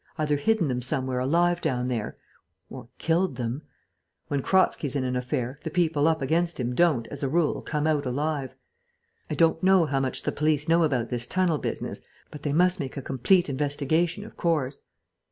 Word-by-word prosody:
Either 150 Hz, -2 st, +1 dB
hidden 220 Hz, +2 st, +1 dB
them 125 Hz, -2 st, -1 dB
somewhere 130 Hz, 0 st, 0 dB
alive 170 Hz, +6 st, +2 dB
down 125 Hz, -6 st, -1 dB
there, 115 Hz, -4 st, -3 dB, 0.5 s
or -, -, -9 dB
killed 165 Hz, -2 st, +1 dB
them. 120 Hz, +3 st, -3 dB, 0.7 s
When 140 Hz, -1 st, 0 dB
Kratzky's 150 Hz, -5 st, +2 dB
in 135 Hz, -, 0 dB
an 125 Hz, 0 st, -1 dB
affair, 125 Hz, +1 st, -2 dB
the 160 Hz, -, -3 dB
people 160 Hz, -3 st, +2 dB
up 160 Hz, -3 st, +1 dB
against 170 Hz, +4 st, 0 dB
him 125 Hz, 0 st, -1 dB
don't, 145 Hz, -6 st, +2 dB
as 140 Hz, -, -8 dB
a 135 Hz, -, 0 dB
rule, 165 Hz, +1 st, +1 dB
come 150 Hz, -1 st, -2 dB
out 150 Hz, -3 st, +1 dB
alive.... 140 Hz, +1 st, -2 dB, 0.7 s
I -, -, -2 dB
don't 165 Hz, -1 st, +3 dB
know 190 Hz, -2 st, +5 dB
how 140 Hz, -2 st, 0 dB
much 135 Hz, -1 st, -2 dB
the -, -, 0 dB
police 150 Hz, 0 st, 0 dB
know 165 Hz, +1 st, +4 dB
about 125 Hz, -7 st, 0 dB
this 120 Hz, -1 st, -3 dB
tunnel 180 Hz, -5 st, +1 dB
business, -, -, -4 dB, 0.3 s
but 150 Hz, -, -9 dB
they 145 Hz, -, -2 dB
must 180 Hz, +4 st, +3 dB
make 135 Hz, -1 st, -5 dB
a -, -, -3 dB
complete 175 Hz, +9 st, +2 dB
investigation, 150 Hz, +7 st, -1 dB
of 225 Hz, -, -13 dB
course." 150 Hz, -6 st, -1 dB
150 Hz, 190 wpm, -26 LUFS, 130-165 Hz, 0.7 s, know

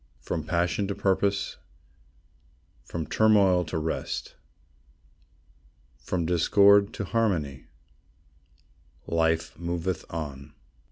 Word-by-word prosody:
From 80 Hz, -, -4 dB
passion 90 Hz, +5 st, 0 dB
to 100 Hz, -, -3 dB
purpose, 100 Hz, +1 st, 0 dB, 1.3 s
From 80 Hz, -2 st, -4 dB
turmoil 100 Hz, -5 st, +4 dB
to 80 Hz, -, -4 dB
rest, 80 Hz, +1 st, -3 dB, 1.7 s
From 85 Hz, +8 st, -2 dB
discord 100 Hz, +4 st, +5 dB
to 100 Hz, -, -3 dB
harmony, 85 Hz, -, -1 dB, 1.4 s
Life 80 Hz, 0 st, 0 dB
moveth 85 Hz, 0 st, -3 dB
on. 75 Hz, -3 st, -6 dB
85 Hz, 80 wpm, -27 LUFS, 80-100 Hz, 1.7 s, discord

